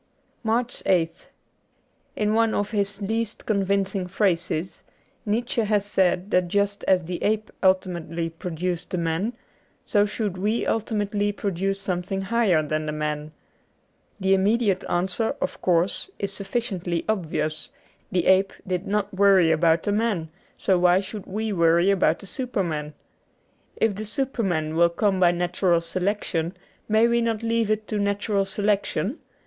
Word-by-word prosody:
^ - - -41 0.4
73 225 - -3 0.5
MARCH 165 -2 0
8th 165 - -24 0.9
IN 210 0 +1
one 225 0 +2
of 205 0 -1
his 200 -1 -2
least 225 +2 -2
convincing 195 -2 0
phrases, 180 -3 0 0.5
Nietzsche 230 +2 0
had 210 -2 +1
said 190 -1 +1
that 180 -1 +3
just 200 +2 0
as 185 -2 +3
the 175 +1 -5
ape 215 0 0
ultimately 175 -3 +1
pro 165 +2 -6
duced 175 +1 -3
the 185 - -2
man, 170 +7 -1 0.5
so 205 -1 +3
should 205 -3 -3
we 215 +4 0
ultimately 205 -2 0
produce 195 -1 -2
something 190 0 -2
higher 195 -5 +2
than 155 +1 -2
the - - -1
man. 150 0 -3 0.9
The 190 0 +3
immediate 200 0 +2
answer, 190 +6 0
of - - -3
course, 180 - +1
is 200 -1 -3
sufficiently 195 -5 -2
obvious: 160 -6 -2 0.4
the 180 -2 +1
ape 190 +1 +4
did 180 0 -2
not 205 0 -1
worry 190 -4 +5
about 165 +1 +3
the 205 - 0
man, 205 -7 0 0.3
so 185 -2 +2
why 180 +1 +5
should 200 +1 -7
we 215 +2 -2
worry 170 +2 +4
about 175 -4 +3
the - - -12
superman? 175 - -3 0.8
If 225 -2 +1
the 215 +2 -5
superman 200 - -1
will 170 +1 +5
come 190 +2 +1
by 180 -2 +6
natural 175 0 +1
selection, 180 0 -2 0.3
may 220 +2 +5
we 235 0 +2
not 230 -1 -1
leave 230 -1 +1
it 215 0 0
to 215 - -1
natural 200 0 0
selection 205 - -1
195 Hz, 150 wpm, -24 LUFS, 175-210 Hz, 0.9 s, by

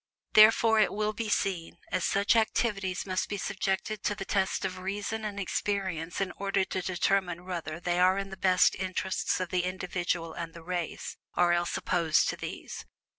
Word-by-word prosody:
Therefore, 220 +1 +7
it 215 - +4
will 210 +1 -1
be 220 0 -3
seen, 185 -5 -1 0.2
all 185 - +1
such 200 +5 +2
activities 210 -4 0
must 185 -1 -1
be 205 - -2
subjected 195 +2 -2
to 205 - 0
the 195 - -6
test 190 -1 0
of 185 -1 -4
reason 205 +3 -3
and 205 -1 -4
experience 190 -4 -2
in 195 -1 -1
order 195 -1 +1
to 185 - -3
determine 180 -1 0
whether 170 -3 -4
they 175 0 0
are 185 +1 +5
in 195 0 -4
the - - -5
best 185 -1 +4
interests 185 0 -1
of 185 -1 -2
the 180 0 0
individual 175 -2 -2
and 165 -1 -6
the 170 - -10
race, 175 -1 -4 0.2
or 175 -1 +4
else 175 0 0
opposed 170 -4 +2
to - - -2
these. - - -7
185 Hz, 180 wpm, -29 LUFS, 175-200 Hz, 0.2 s, Therefore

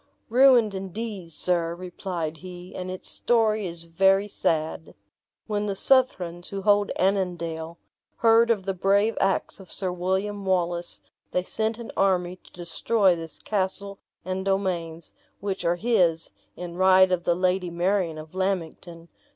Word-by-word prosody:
"Ruined, 245 -3 +5
indeed, 195 -1 -5
sir," 170 0 -1
replied 175 -3 -5
he; 180 +2 -10
"and 185 0 -5
its 185 0 -7
story 220 -4 +1
is 170 -1 -4
very 195 +4 +3
sad. 160 -4 -2 0.5
When 210 -1 -2
the 200 - -2
Southrons, 185 -8 +1
who 195 -1 -5
hold 205 0 +3
Annandale, 170 -4 -1 0.4
heard 230 0 +4
of 205 -5 +1
the 195 - -1
brave 200 +4 +2
acts 195 +1 0
of 190 - -12
Sir 185 -2 -1
William 190 +3 -2
Wallace, 175 -2 0 0.3
they 180 - 0
sent 220 +3 -2
an 235 -1 -8
army 185 -2 +1
to - - -22
destroy 185 +3 +1
this 165 -2 -7
castle 200 0 -2 0.3
and 185 +1 -3
domains, 175 -4 -2 0.3
which 195 -1 -3
are 170 +1 +2
his, 175 -6 +1 0.2
in 175 -1 -7
right 185 0 +6
of 180 -1 0
the 175 - +2
Lady 180 0 0
Marion 175 -1 0
of 155 +1 -10
Lammington. 175 -3 -3
185 Hz, 145 wpm, -25 LUFS, 175-200 Hz, 0.5 s, right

